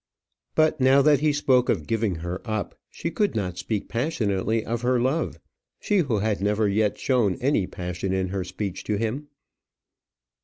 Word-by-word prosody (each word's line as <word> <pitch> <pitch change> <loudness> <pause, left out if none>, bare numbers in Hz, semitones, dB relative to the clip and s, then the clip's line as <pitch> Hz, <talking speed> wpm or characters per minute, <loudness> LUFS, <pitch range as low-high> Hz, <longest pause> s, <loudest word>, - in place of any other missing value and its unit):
But 155 -2 +3
now 135 +2 +5
that 145 -2 +5
he 155 0 +2
spoke 130 -4 +2
of - - +1
giving 110 -5 0
her 90 +2 -4
up, 110 -5 -3 0.2
she 170 - -4
could 205 +5 0
not 90 -4 -2
speak 105 -3 -3
passionately 115 - -1
of 115 0 -2
her 125 0 +2
love 130 +7 -1 0.4
she 205 -2 +1
who 135 -10 +1
had 105 -1 0
never 105 +1 +2
yet 105 +1 +1
shown 120 -8 +1
any 125 -8 +1
passion 90 +1 -4
in 95 -1 0
her 95 0 -2
speech 95 +1 -5
to 105 - 0
him. 115 +8 -2
110 Hz, 175 wpm, -25 LUFS, 100-135 Hz, 0.4 s, now